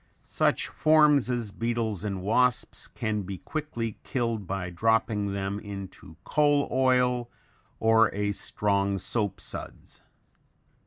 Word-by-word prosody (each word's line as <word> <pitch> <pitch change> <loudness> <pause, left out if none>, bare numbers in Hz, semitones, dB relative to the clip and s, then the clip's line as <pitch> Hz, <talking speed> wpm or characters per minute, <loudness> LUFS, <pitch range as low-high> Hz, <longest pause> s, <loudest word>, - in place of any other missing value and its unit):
Such - - +1
forms 150 -4 +4
as 120 -4 -2
beetles 115 -3 -2
and 100 -3 -3
wasps 125 +4 +1
can 110 -2 -2
be 95 0 -6
quickly 120 - -4
killed 115 -6 -2
by 95 -2 -3
dropping 105 +1 +1
them 100 +1 -2
into 100 -6 -9
coal 145 -1 +2
oil 125 -2 +2 0.5
or 110 -1 +4
a 105 0 -1
strong 100 -1 0
soap 100 -1 -1
suds. - - -8
110 Hz, 115 wpm, -27 LUFS, 100-125 Hz, 0.5 s, forms